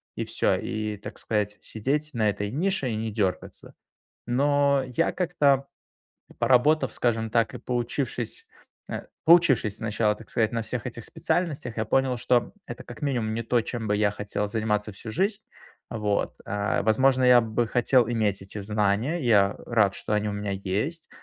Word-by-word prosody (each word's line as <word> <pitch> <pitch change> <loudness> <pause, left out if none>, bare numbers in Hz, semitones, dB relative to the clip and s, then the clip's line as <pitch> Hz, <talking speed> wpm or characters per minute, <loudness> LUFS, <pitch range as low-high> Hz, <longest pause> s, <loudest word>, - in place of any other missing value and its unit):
и - - -3
всё. - - +1
И, 110 -1 -3
так 100 - -9
сказать, 105 -1 -1
сидеть 145 +8 -2
на 110 -3 +2
этой 105 0 -3
нише 165 - 0
и 110 - -2
не 110 0 -3
дёргаться. 100 -4 -3 0.5
Но 140 +2 +2
я 130 +7 0
как-то, 145 -6 +2 0.7
поработав, 135 +2 +3
скажем 115 -2 0
так, 115 +1 +1
и - - -5
поучившись, 120 0 -3 0.4
э, - - -5 0.2
поучившись 155 - +5
сначала, 105 -1 0
так 110 - -14
сказать, 110 -1 +1
на 115 -1 -1
всех 110 +1 -4
этих 120 -2 -7
специальностях, 150 -9 -2
я 110 - +1
понял, 130 +2 +1
что 120 +1 +1
это, - - -8
как - - -11
минимум, 120 -6 -1
не 115 - -2
то, 120 +1 +2
чем 115 -1 -4
бы 105 - +2
я 105 -1 +2
хотел 105 0 -3
заниматься 105 -1 -1
всю 110 +3 -9
жизнь, 200 - 0 0.5
вот. 105 -3 -1
А, 100 +1 -1
возможно, 130 +5 +3
я 125 -1 +7
бы 115 +1 -1
хотел 120 +1 +3
иметь 105 -4 0
эти 95 +2 -6
знания. 105 - 0
Я 100 -4 +4
рад, 110 -4 +2
что - - -4
они 105 0 +1
у - - -2
меня 105 -1 -3
есть. 105 - -3
115 Hz, 170 wpm, -26 LUFS, 105-130 Hz, 0.7 s, я